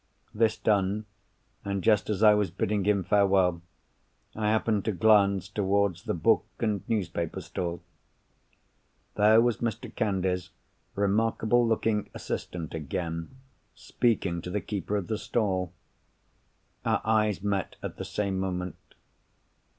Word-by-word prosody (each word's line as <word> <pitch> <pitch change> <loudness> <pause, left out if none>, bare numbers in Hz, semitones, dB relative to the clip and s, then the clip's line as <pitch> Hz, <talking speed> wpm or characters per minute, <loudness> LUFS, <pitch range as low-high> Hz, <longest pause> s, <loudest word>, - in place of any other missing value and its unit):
This 110 0 +2
done, 105 0 +1 0.6
and 100 -2 -2
just 105 -2 +3
as 105 0 0
I 105 -1 +8
was 105 -3 +1
bidding 95 +3 -1
him 100 -2 +2
farewell, 95 -3 +3 0.7
I 105 -1 0
happened 110 -2 +1
to 110 - +1
glance 100 0 +3
towards 100 -2 0
the - - -1
book 80 - +3 0.2
and 105 -4 0
newspaper 85 -6 -2
stall. 85 -2 -4 1.3
There 105 +2 +5
was 120 -1 +2
Mr. 115 -4 -4
Candy's 95 -4 -1 0.5
remarkable 110 +3 +2
looking 110 -2 0
assistant 85 -3 -5
again, 80 - -4 0.4
speaking 95 -7 0
to 90 - -7
the 105 +3 -1
keeper 105 0 -3
of 100 - -3
the 110 +1 -3
stall! 100 -5 -1 1.1
Our - - +1
eyes 110 -3 +1
met 100 -2 -1
at - - -5
the - - -5
same 100 -2 -2
moment. 90 -2 -3
100 Hz, 125 wpm, -28 LUFS, 95-110 Hz, 1.3 s, I